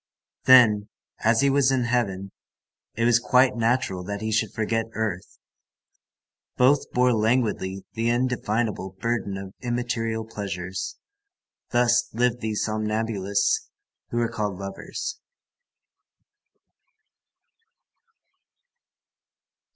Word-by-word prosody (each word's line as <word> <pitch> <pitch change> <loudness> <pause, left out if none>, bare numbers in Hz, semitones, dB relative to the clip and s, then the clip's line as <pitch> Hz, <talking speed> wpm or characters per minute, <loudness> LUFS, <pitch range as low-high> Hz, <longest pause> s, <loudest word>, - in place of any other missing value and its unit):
Then, 110 -5 +6 0.3
as 110 +2 +3
he 140 - +4
was 135 -1 +3
in 130 -2 +1
heaven, 100 -6 -1 0.6
it 115 - 0
was 120 0 +5
quite 125 +1 +3
natural 115 -5 0
that 100 +1 -4
he 110 +1 -3
should 110 - +1
forget 115 +1 -1
earth. 105 -5 -4 1.2
Both 135 +3 +3
bore 125 0 +3
languidly 110 -4 0
the 115 +1 0
indefinable 120 -5 -1
burden 115 -3 -2
of 95 0 -8
immaterial 120 -2 -2
pleasures. 95 -4 -5 0.7
Thus 120 0 +3
lived 120 0 +1
these 110 -1 -1
somnambulists 110 -2 0 0.4
who 120 - -3
are 120 - +2
called 105 -4 -3
lovers. 100 - -6
115 Hz, 95 wpm, -25 LUFS, 100-120 Hz, 1.2 s, Then